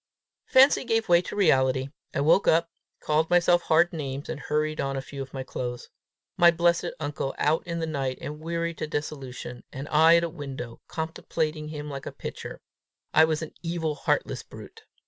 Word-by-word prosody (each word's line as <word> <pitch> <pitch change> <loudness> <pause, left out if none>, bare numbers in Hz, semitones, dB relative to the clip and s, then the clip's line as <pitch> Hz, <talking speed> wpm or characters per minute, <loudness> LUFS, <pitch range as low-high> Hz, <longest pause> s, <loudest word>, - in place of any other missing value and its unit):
Fancy 265 +1 +6
gave 225 -2 0
way 175 0 +6
to 180 - -7
reality. 130 -8 +3 0.2
I - - -1
woke 160 +7 +4
up, 165 +1 +3 0.3
called 155 +1 +1
myself 175 0 +4
hard 170 +2 +3
names, 140 -3 -5
and 155 - -4
hurried 155 +1 -1
on 135 0 -2
a - - 0
few 140 +1 -8
of 135 -1 -7
my 135 -1 -5
clothes. 125 -1 -5 0.5
My 175 - +7
blessed 170 +1 +2
uncle 145 -2 -3
out 155 +2 +2
in 170 -1 -3
the 165 - -1
night 135 -5 -2
and 150 +1 -6
weary 170 +1 -2
to 155 - -5
dissolution, 135 -5 -5
and 135 +2 -6
I 160 +2 +6
at 170 - +1
a - - +1
window, 135 -7 -7
contemplating 160 -1 -3
him 150 -1 -6
like 140 -2 -6
a - - -4
picture! - - -7 0.5
I 160 - +7
was 160 0 -1
an 155 - -8
evil, 165 -2 -2
heartless 145 - -1
brute! - - -13
155 Hz, 185 wpm, -26 LUFS, 140-170 Hz, 0.5 s, My